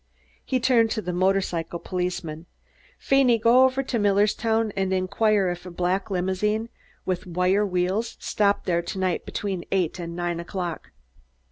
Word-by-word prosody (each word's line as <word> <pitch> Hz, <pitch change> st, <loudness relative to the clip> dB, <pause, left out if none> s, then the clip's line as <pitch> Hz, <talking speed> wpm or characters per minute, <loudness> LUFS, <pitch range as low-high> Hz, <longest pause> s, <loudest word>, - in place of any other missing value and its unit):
He 260 Hz, -, 0 dB
turned 240 Hz, -3 st, +3 dB
to 215 Hz, -, -1 dB
the 180 Hz, -, -3 dB
motorcycle 180 Hz, -2 st, 0 dB
policeman. 175 Hz, -3 st, -4 dB, 0.5 s
"Feeney, 270 Hz, -3 st, +3 dB
go 235 Hz, +4 st, +5 dB
over 260 Hz, +1 st, +1 dB
to 250 Hz, -3 st, -2 dB
Millerstown 210 Hz, +2 st, +2 dB
and 190 Hz, -1 st, 0 dB
inquire 195 Hz, +1 st, +2 dB
if 175 Hz, 0 st, -5 dB
a 180 Hz, -, -8 dB
black 180 Hz, +4 st, -1 dB
limousine 200 Hz, +4 st, -1 dB, 0.4 s
with 185 Hz, -1 st, -2 dB
wire 180 Hz, +3 st, +2 dB
wheels 190 Hz, +5 st, -1 dB
stopped 205 Hz, -1 st, +1 dB
there 170 Hz, -2 st, +1 dB
to 170 Hz, -, -6 dB
night 185 Hz, -2 st, -1 dB
between 190 Hz, -4 st, -3 dB
eight 185 Hz, -2 st, 0 dB
and 170 Hz, -1 st, -5 dB
nine 175 Hz, -1 st, -2 dB
o'clock." 175 Hz, -1 st, -5 dB
190 Hz, 150 wpm, -25 LUFS, 180-215 Hz, 0.5 s, go